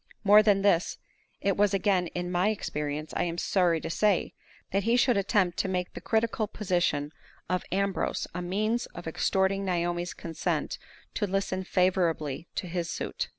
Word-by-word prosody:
More 210 +1 +8
than 205 -2 +3
this, 180 -4 +2 0.4
it 195 -1 +1
was 205 -1 +3
again 190 -2 +2
in 180 +1 -4
my 180 +3 +2
experience, 150 -7 -3
I - - 0
am 170 -1 -3
sorry 175 -3 +2
to - - -4
say, 205 0 +1 0.4
that 195 - +2
he 230 +4 +2
should 245 -1 +4
attempt 195 -3 +1
to - - +1
make 180 -1 -2
the - - -8
critical 220 -1 0
position 175 -8 0 0.4
of 180 0 -1
Ambrose 195 +1 0
a 180 - -3
means 215 +6 -1
of 175 - -7
extorting 190 +4 +1
Naomi's 175 -1 -1
consent 165 -1 -3 0.3
to 205 - -1
listen 190 -1 -1
favorably 175 -5 0
to - - -2
his 170 -1 -3
suit. - - -3
185 Hz, 165 wpm, -28 LUFS, 175-200 Hz, 0.4 s, More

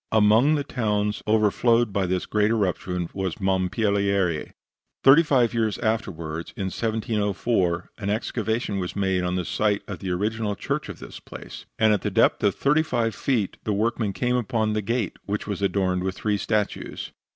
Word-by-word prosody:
Among 110 +7 +5
the 145 - -1
towns 105 -5 -1
overflowed 110 +1 +3
by 100 -2 +1
this 90 0 -1
great 105 0 +1
eruption 90 -5 -1
was 95 -3 -2
Mompilieri. 95 -2 +1 0.5
Thirty 135 +4 +8
five 130 -7 +2
years 110 -3 0
afterward, 85 -8 -3
in 95 -2 -2
1704, 105 -5 -1
an 100 -2 -3
excavation 110 -1 -1
was 90 -1 -4
made 95 -2 +1
on 90 0 -1
the 90 -1 -1
site 105 +2 0
of - - -6
the 90 -2 -2
principal 105 +1 -1
church - - -3
of - - -7
this - - -10
place, - - -10
and 110 -1 +4
at 105 - 0
the - - -1
depth 110 +3 +3
of 100 -2 +3
thirty 150 +3 +3
five 120 -7 -1
feet 115 -8 -1
the 105 - -1
workmen 110 0 0
came 125 +6 0
upon 110 -2 0
the 105 - 0
gate, 115 +4 -2
which 105 +1 -2
was 100 -2 -4
adorned 95 -2 +1
with 95 0 -2
three 105 -1 0
statues. 105 0 -2
105 Hz, 175 wpm, -24 LUFS, 95-115 Hz, 0.5 s, Thirty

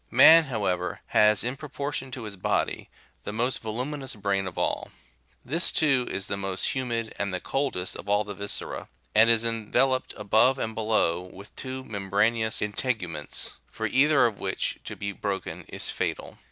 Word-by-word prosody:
Man, 165 0 +8
however, 95 -8 -2
has, 105 -1 +4
in 125 +3 -2
proportion 140 -2 -4
to 125 -2 -6
his 105 -2 -6
body, 90 - -1 0.3
the - - -4
most 120 +4 0
voluminous 130 +5 -4
brain 100 -2 0
of 90 - -8
all. - - -1 0.6
This, 165 +7 +3
too, 135 -6 +3
is 95 0 -3
the 100 - -2
most 95 -1 -1
humid, 120 -4 -2
and 100 -1 -1
the 90 - -2
coldest 135 -10 -2
of 100 - -8
all 105 +1 +3
the 105 0 -6
viscera, 100 +1 -4 0.2
and 110 +2 +6
is 115 -1 +4
enve 115 -2 -3
loped 130 -1 +2
above 110 +6 +3
and 110 -3 -3
below 110 -6 +1
with 95 +3 -12
two 130 0 -5
membranous 110 +2 0
integuments, 105 - -2
for 110 - -5
either 135 +3 +4
of 110 -4 -1
which 95 - -1
to - - -5
be 100 0 -4
broken 100 -1 -4
is - - -3
fatal. - - -3
110 Hz, 170 wpm, -27 LUFS, 100-130 Hz, 0.6 s, Man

